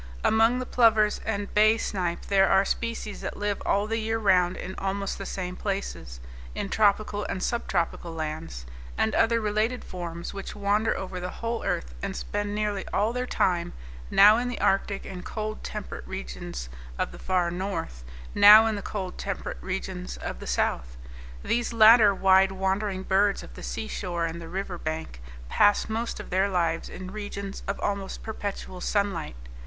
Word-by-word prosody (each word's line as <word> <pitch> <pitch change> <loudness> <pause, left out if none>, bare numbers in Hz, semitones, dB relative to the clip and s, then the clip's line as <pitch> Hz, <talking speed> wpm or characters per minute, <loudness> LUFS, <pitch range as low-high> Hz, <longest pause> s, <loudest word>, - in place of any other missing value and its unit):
Among 225 +3 +4
the 255 - -3
plovers 220 -4 +3
and 205 -2 -2
bay 215 +1 +5
snipe 180 -6 -2
there 195 -1 +4
are 195 +1 +4
species 230 -1 -3
that - - -5
live 205 -1 -2
all 200 +1 +2
the 225 +1 -1
year 225 +1 -1
round 185 -4 +3
in 190 - -6
almost 195 0 -2
the 195 - -5
same 180 -1 -4
places, 195 - -4 0.4
in 200 - -3
tropical 210 0 +2
and 185 - -3
subtropical 175 -7 -1
lands; 155 - -5 0.3
and 220 - +1
other 230 +1 +3
related 215 +3 0
forms 170 -2 -6
which 195 +1 -6
wander 205 +2 +1
over 185 -1 -5
the 180 0 -4
whole 230 +3 -4
earth, - - -2
and - - -3
spend 205 - -3
nearly 210 -2 -1
all 215 +3 +1
their 250 0 -2
time, 175 -7 0 0.4
now 210 +2 +7
in 245 +1 -1
the 245 - -4
arctic 195 0 +1
and 180 -1 -7
cold 215 +1 -5
temperate 210 -2 -6
regions 175 - -6 0.3
of - - -1
the - - -11
far 180 -2 +1
north, 175 - -4 0.3
now 210 +2 +9
in 220 -1 +1
the 200 - -4
cold 190 -3 -5
temperate 60 - -4
regions - - -4
of - - -6
the - - -8
south. - - -1 0.5
These 240 0 0
latter 220 -1 +8
wide 190 0 +5
wandering 190 0 -1
birds 195 +1 +2
of - - -12
the - - -10
seashore 180 -6 -3
and 165 +1 -5
the 165 - -8
river 185 -1 -4
bank 155 - -5 0.3
pass 205 - +3
most 225 +2 -3
of - - -9
their 190 +2 +2
lives 170 -3 0
in 185 0 -8
regions 200 -1 -6
of 195 - -2
almost 200 -1 -3
perpetual 200 -4 -5
sunlight. 200 - -1
195 Hz, 170 wpm, -27 LUFS, 180-215 Hz, 0.5 s, now